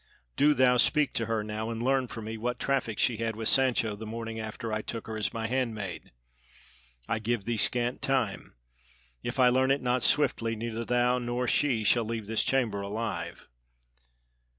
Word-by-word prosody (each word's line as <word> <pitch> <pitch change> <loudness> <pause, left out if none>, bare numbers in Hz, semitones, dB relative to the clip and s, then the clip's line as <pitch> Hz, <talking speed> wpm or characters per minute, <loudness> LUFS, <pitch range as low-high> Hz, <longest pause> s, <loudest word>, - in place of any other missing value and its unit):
Do 150 +1 +4
thou 125 -1 +4
speak 145 +2 +3
to 115 - -1
her 110 -2 -1
now 110 +1 -4
and 115 0 -4
learn 130 0 +2
for 115 -1 -7
me 110 +1 -5
what 120 +2 -3
traffic 130 -6 -1
she 120 - +2
had 115 -1 -2
with 110 0 -1
Sancho 125 -5 +3
the 110 +1 -8
morning 115 0 -5
after 110 +1 -5
I 110 - -1
took 115 +1 -5
her 110 - -6
as 110 -1 -1
my 115 -1 -4
handmaid. 110 - -3 1.0
I 110 - -1
give 110 -2 -2
thee 120 - -1
scant 120 +3 +1
time; 130 - -1 0.7
if - - -4
I 125 -1 +6
learn 130 +1 +2
it 135 +1 +3
not 125 0 +1
swiftly 115 -5 +2
neither 115 +1 -4
thou 125 +1 +2
nor 120 +1 -2
she 120 -4 +2
shall 115 +3 +3
leave 110 -1 -4
this 110 +1 0
chamber 115 -7 0
alive!" 105 +3 -4
115 Hz, 185 wpm, -29 LUFS, 110-125 Hz, 1.0 s, I